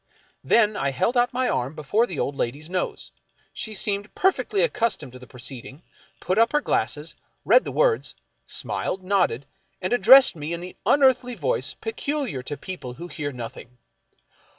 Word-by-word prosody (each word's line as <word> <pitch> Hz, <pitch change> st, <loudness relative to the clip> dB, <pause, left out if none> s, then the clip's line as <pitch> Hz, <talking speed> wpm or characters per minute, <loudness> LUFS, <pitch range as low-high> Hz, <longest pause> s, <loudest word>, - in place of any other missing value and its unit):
Then 215 Hz, -2 st, +3 dB
I 140 Hz, -, 0 dB
held 140 Hz, -, 0 dB
out 245 Hz, 0 st, +3 dB
my 255 Hz, 0 st, 0 dB
arm 130 Hz, +5 st, -1 dB
before 205 Hz, -, +1 dB
the 175 Hz, -, -6 dB
old 140 Hz, -, -1 dB
lady's 145 Hz, +6 st, -3 dB
nose. 185 Hz, -, -3 dB, 0.4 s
She 220 Hz, -1 st, -5 dB
seemed 205 Hz, +1 st, -3 dB
perfectly 395 Hz, +4 st, +2 dB
accus 230 Hz, -, 0 dB
tomed 130 Hz, -, -10 dB
to 125 Hz, -, -12 dB
the 125 Hz, -, -13 dB
proceeding, 130 Hz, +4 st, -9 dB, 0.4 s
put 185 Hz, +4 st, 0 dB
up 230 Hz, +4 st, +4 dB
her 295 Hz, -, +4 dB
glasses, -, -, -1 dB, 0.3 s
read -, -, +5 dB
the -, -, -4 dB
words, -, -, +1 dB, 0.3 s
smiled, 190 Hz, -, -3 dB
nodded, 185 Hz, -10 st, +1 dB, 0.3 s
and 185 Hz, +4 st, -2 dB
addressed 250 Hz, +3 st, +7 dB
me 155 Hz, +1 st, -4 dB
in 170 Hz, -, -3 dB
the 180 Hz, +1 st, -8 dB
unearthly 260 Hz, -3 st, +4 dB
voice 135 Hz, -, -2 dB
peculiar 230 Hz, -, -3 dB
to 140 Hz, +3 st, -6 dB
people 130 Hz, -10 st, -7 dB
who 175 Hz, +4 st, -8 dB
hear 145 Hz, -4 st, -4 dB
nothing. 120 Hz, 0 st, -9 dB
185 Hz, 170 wpm, -24 LUFS, -, 0.4 s, addressed